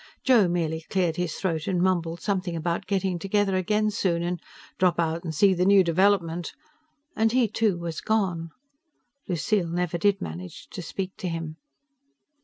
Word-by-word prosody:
Joe 235 -7 +5
merely 165 -2 -1
cleared 175 -4 0
his 180 -2 -2
throat 165 -4 -2
and 185 -2 +1
mumbled 175 -2 0
something 185 -4 -1
about 170 +3 -2
getting 190 -3 0
together 195 +1 +1
again 210 +3 +1
soon 170 -4 0
and 175 -1 -2 0.4
"drop 180 -2 +3
out 165 0 0
and 160 -3 -4
see 195 +5 +5
the 180 0 +1
new 195 0 +6
development" 175 -1 +1 0.6
and 220 0 +2
he, 250 -1 +3
too, 215 -3 +1
was 170 -2 -5
gone. 185 -7 0 0.8
Lucille 180 +1 0
never 175 0 -1
did 200 +2 +3
manage 85 +3 -7
to - - -7
speak 190 +2 -5
to 185 - -4
him. 165 -1 -5
180 Hz, 165 wpm, -26 LUFS, 170-195 Hz, 0.8 s, new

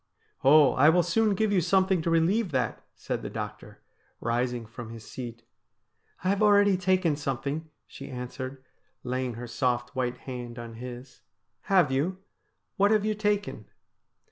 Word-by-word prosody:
' - - -39
Oh, 145 +1 +7
I 145 +4 +6
will 175 +2 +4
soon 205 +4 +2
give 215 +1 +1
you 185 - +4
something 190 +1 +2
to 170 - -1
relieve 175 +6 +2
that,' 130 -4 -1
said - - -4
the - - -5
doctor, - - -7 0.4
rising 120 0 -1
from 115 +1 -9
his 115 -2 -10
seat. 120 -2 -7 0.4
' - - -31
I've 195 +2 +1
already 205 -2 +5
taken 185 -3 +2
something,' 145 +2 -3 0.2
she - - -10
answered, 130 +1 -6 0.4
laying 125 -1 -2
her 120 +2 -6
soft 120 +1 -1
white 125 -1 -1
hand 125 -2 -6
on 120 -1 -7
his. 125 +1 -9 0.2
' 105 +4 -51
Have 170 -7 +5
you? 155 +8 0 0.6
What 200 +1 +5
have 215 -1 +3
you 215 - +1
taken 205 -1 -1
140 Hz, 165 wpm, -28 LUFS, 125-185 Hz, 0.6 s, Oh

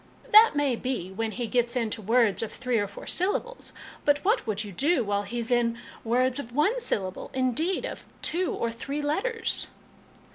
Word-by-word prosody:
" - - -21
That 435 -5 +9
may 285 -4 +2
be, 235 -7 -3
when 225 +3 -2
he 240 +2 -3
gets 240 +1 0
into 230 -2 -1
words 220 -2 +3
of 225 - -3
three 250 -3 -1
or 205 - 0
four 200 - -10
syllables; 410 +7 -1 0.3
but 290 0 +4
what 425 - +2
would 215 0 -1
you 205 - -8
do 280 - +2
while 205 -1 0
he's 230 +3 -4
in 235 -1 +2 0.3
words 250 +3 +1
of 240 -4 -7
one 400 - +2
syllable 190 - -2
indeed, 265 +8 +1
of - - -6 0.2
two 355 +2 +2
or 230 - -2
three 275 +6 -4
letters?" 425 +11 0
245 Hz, 185 wpm, -27 LUFS, 225-300 Hz, 0.3 s, That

